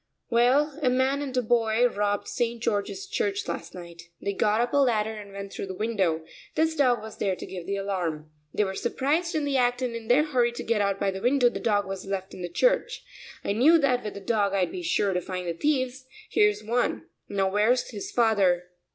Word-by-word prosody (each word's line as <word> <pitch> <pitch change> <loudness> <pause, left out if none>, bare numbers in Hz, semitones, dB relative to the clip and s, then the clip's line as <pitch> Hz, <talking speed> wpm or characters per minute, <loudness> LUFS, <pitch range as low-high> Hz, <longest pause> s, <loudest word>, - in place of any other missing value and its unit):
"Well, 270 +6 +3
a 260 - +3
man 260 +3 +1
and 265 -3 -4
a 250 - +2
boy 230 +1 +3
robbed 205 -3 -1
St. 235 0 -2
George's 210 - -2
Church 410 -1 -2
last - - -5
night. 170 -1 -11
They 200 - -2
got 210 +2 +2
up 240 0 0
a - - +3
ladder 220 -5 +2
and 205 -2 -9
went 200 0 -7
through - - -5
the 190 - -6
window. 190 -7 0 0.3
This 320 0 +2
dog 255 -6 +3
was 220 -1 -9
there 195 -2 0
to - - -8
give 180 -2 -8
the 200 - -1
alarm. 175 -6 -3 0.2
They 210 - +1
were 190 -1 -2
surprised 290 - -1
in 305 -2 0
the 280 -1 +1
act 245 0 +1
and 240 -2 -2
in 230 -1 -7
their 260 +5 +5
hurry 250 -6 +1
to - - -5
get 225 -2 +1
out 200 -1 0
by 195 - +1
the 190 0 -6
window, 250 +1 +4
the - - -6
dog 205 -3 +1
was 195 -1 -5
left 195 -1 -4
in - - -9
the 175 - -4
church. - - +1 0.4
I - - 0
knew 285 +10 +6
that 270 -5 +1
with 210 - -5
the 200 - -7
dog 200 -1 +1
I'd 185 -2 +1
be 365 - -5
sure 205 - +1
to 180 - 0
find 180 0 -5
the 170 - -1
thieves; 260 - -1 0.2
here's 210 0 +3
one, 240 +3 0 0.2
now 195 -1 0
where's 225 +6 +2
his 205 -4 -6
father?" 190 -7 +2
220 Hz, 230 wpm, -26 LUFS, 195-255 Hz, 0.4 s, knew